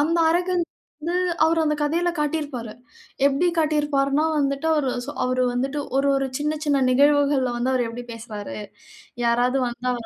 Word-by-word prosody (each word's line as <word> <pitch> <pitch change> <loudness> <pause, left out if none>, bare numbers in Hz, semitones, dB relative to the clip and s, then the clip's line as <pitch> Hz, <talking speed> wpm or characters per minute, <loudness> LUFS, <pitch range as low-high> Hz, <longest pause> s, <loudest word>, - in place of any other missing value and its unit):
அந்த 330 +3 +2
அரகன்ஸ் 350 0 +1 0.4
வந்து 340 +3 -1 0.3
அவரு 325 +1 +2
அந்த 300 - +1
கதையில 335 +4 +1
காட்டியிருப்பாரு. 290 -7 -2 0.5
எப்படி 280 +5 +2
காட்டியிருப்பார்னா, 295 -2 +1
வந்துட்டு 280 +1 0 0.6
அவரு 255 0 +1
வந்துட்டு 270 +4 -2 0.2
ஒரு 275 +1 +2
ஒரு 270 0 +1
சின்ன 300 +1 -1
சின்ன 285 -2 +2
நிகழ்வுகள்ல 280 -1 +3
வந்து 240 +2 0
அவர் 255 -2 +1
எப்படி 240 +2 -7
பேசுறாரு? 220 -3 -7 0.7
யாராவது 245 +3 +2
வந்தா 245 +1 -2
280 Hz, 135 wpm, -23 LUFS, 250-300 Hz, 0.7 s, நிகழ்வுகள்ல